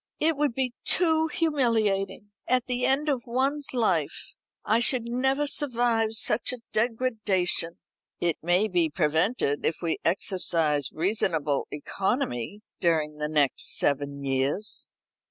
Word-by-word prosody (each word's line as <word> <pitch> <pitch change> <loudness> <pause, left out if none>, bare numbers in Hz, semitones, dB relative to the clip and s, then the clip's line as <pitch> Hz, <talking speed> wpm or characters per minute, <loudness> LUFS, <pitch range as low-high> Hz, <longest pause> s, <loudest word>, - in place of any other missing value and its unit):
"It 320 +1 +2
would 285 -4 -1
be 255 -2 -1
too 320 -2 +2
humiliating! 225 -11 0 0.2
At 255 -1 +2
the 250 0 -1
end 280 +3 +1
of 265 -5 -1
one's 270 +4 -1
life. 185 - -1 0.3
I 225 - +3
should 240 0 +3
never 265 +4 0
survive 240 -6 +1
such 220 +2 +4
a 250 -2 -5
degradation." 215 -7 +1 0.4
"It 170 -3 0
may 175 +5 +2
be 175 -5 +1
prevented 160 - 0
if 160 - 0
we 165 - -1
exercise 165 - +1
reasonable 160 -5 -1
economy 190 - -3 0.2
during 155 -3 0
the 150 0 -3
next 150 -3 +2
seven 140 0 -1
years." 140 +10 -1
210 Hz, 125 wpm, -26 LUFS, 160-250 Hz, 0.4 s, such